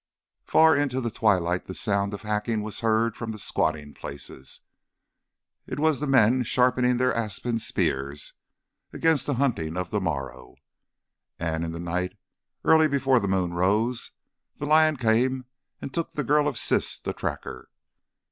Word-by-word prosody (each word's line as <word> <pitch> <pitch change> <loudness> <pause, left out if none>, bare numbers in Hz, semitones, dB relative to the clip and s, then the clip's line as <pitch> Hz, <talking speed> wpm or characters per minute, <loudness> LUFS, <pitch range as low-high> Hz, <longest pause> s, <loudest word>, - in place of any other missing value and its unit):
Far 160 -1 +5
into 140 -3 0
the 120 -3 -2
twilight 90 -5 +1
the 95 - -6
sound 100 0 0
of 100 - -11
hacking 105 +1 -1
was 105 -1 -4
heard 115 0 +1
from 115 -2 -5
the 110 - -7
squatting 80 -7 -1
places. 70 -1 -8 1.1
It - - -5
was 155 -2 +2
the 150 - -2
men 130 -1 +4
sharpening 125 0 +2
their 125 +1 +2
ashen 115 +1 -2
spears 70 -9 -2 0.6
against 160 -3 +1
the 145 - 0
hunting 105 - -1
of 90 - -3
the 105 -2 0
morrow. 65 -7 -4 0.8
And 80 -1 -2
in 80 - -3
the 85 - -6
night, 90 +3 -3 0.5
early 160 -1 +5
before 135 -3 +2
the 100 - -2
moon 95 -2 0
rose, 105 +7 +1 0.5
the 145 - -4
lion 155 0 +4
came 125 +2 +1 0.4
and 135 - -6
took 165 -1 -2
the 150 - -2
girl 145 +3 +3
of 140 -5 -2
Siss - - +1
the - - -4
Tracker. - - -5
110 Hz, 155 wpm, -26 LUFS, 90-130 Hz, 1.1 s, Far